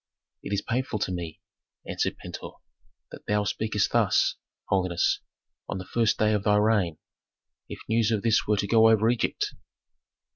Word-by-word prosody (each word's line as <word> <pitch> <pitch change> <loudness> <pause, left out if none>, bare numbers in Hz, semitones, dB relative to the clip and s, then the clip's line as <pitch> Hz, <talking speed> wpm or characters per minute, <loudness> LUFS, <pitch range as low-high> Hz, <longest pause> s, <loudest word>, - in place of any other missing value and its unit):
"It - - -7
is 100 -1 0
painful 120 -2 -2
to 95 - -2
me," 85 -3 -6 0.5
answered - - -2
Pentuer, - - -8 0.6
"that - - -12
thou 105 0 +1
speakest 105 0 -1
thus, - - +3 0.3
holiness, 90 -3 +1 0.5
on - - -3
the 95 - -6
first 115 +3 +1
day 110 0 +2
of 105 -2 0
thy 105 -1 +3
reign. 105 -7 +2 0.7
If - - -8
news 110 -1 +2
of 110 -3 0
this 115 -1 +2
were 105 0 +2
to 100 - 0
go 110 +1 +6
over 110 0 +4
Egypt!" 120 - -1
105 Hz, 160 wpm, -26 LUFS, 95-110 Hz, 0.7 s, go